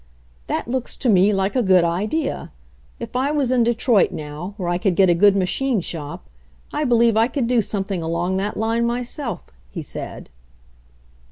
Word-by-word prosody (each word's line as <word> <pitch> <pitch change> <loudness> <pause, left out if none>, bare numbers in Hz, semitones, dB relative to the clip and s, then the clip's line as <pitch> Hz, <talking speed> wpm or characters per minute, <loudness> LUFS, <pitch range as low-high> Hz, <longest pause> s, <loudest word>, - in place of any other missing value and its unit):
"That - - -2
looks 250 0 -3
to 255 - 0
me 195 0 +5
like 195 +2 0
a 255 - +3
good 185 -5 +4
idea. 210 - -2 0.5
If - - -7
I 260 +3 +1
was 285 -4 0
in 255 -2 +3
Detroit 235 -2 +3
now, 155 +6 -7
where 180 -4 -3
I 175 0 0
could 185 -2 +1
get 190 -1 +5
a - - +5
good 200 +3 +5
machine 220 +6 0
shop, 150 - -7 0.5
I 300 - 0
believe 235 -3 +3
I 225 +1 +4
could 265 -1 -2
do 240 -1 +2
something 195 -3 -3
along 170 +3 -1
that 200 +2 -2
line 225 +2 0
myself/' 240 - -4 0.2
he - - -6
said. - - -7
210 Hz, 180 wpm, -21 LUFS, 180-240 Hz, 0.5 s, me